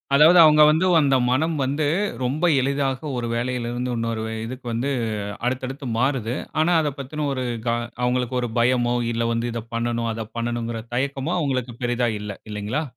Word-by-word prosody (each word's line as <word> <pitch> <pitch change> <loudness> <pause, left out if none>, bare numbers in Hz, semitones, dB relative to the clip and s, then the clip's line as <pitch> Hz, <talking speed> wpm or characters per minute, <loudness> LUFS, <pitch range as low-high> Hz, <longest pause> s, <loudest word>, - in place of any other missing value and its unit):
அதாவது 160 +5 +7
அவங்க 150 -1 +6
வந்து, 160 +4 +3
அந்த 140 -3 +3
மனம் 160 +6 +1
வந்து 145 +3 0 0.4
ரொம்ப 140 +7 -1 0.2
எளிதாக 140 +1 -1
ஒரு 120 -1 -2
வேலையிலிருந்து 125 0 -2
இன்னொரு 115 -1 -2 0.2
இதுக்கு 125 +2 -8
வந்து, 125 +5 -1 0.6
அடுத்தடுத்து 130 +2 -3
மாறுது. 130 -3 0 0.3
ஆனா, 170 +3 +2
அத 150 -2 -1
பத்தின 150 +3 -4
ஒரு 130 -1 -2 0.2
க - - +3 0.3
அவங்களுக்கு 125 0 0
ஒரு 120 - -2
பயமோ, 120 0 +2 0.2
இல்ல 115 0 -1
வந்து 115 +1 -1
இத 115 - -3
பண்ணனும், 115 0 -1
அத 110 0 -5
பண்ணனுங்கிற 115 -1 -2
தயக்கமோ 135 +5 -1
அவங்களுக்கு 130 -6 -2
பெரிதா 120 0 +1
இல்ல. 105 0 -5 0.2
இல்லைங்களா? 105 +9 -2
125 Hz, 155 wpm, -23 LUFS, 120-140 Hz, 0.6 s, அதாவது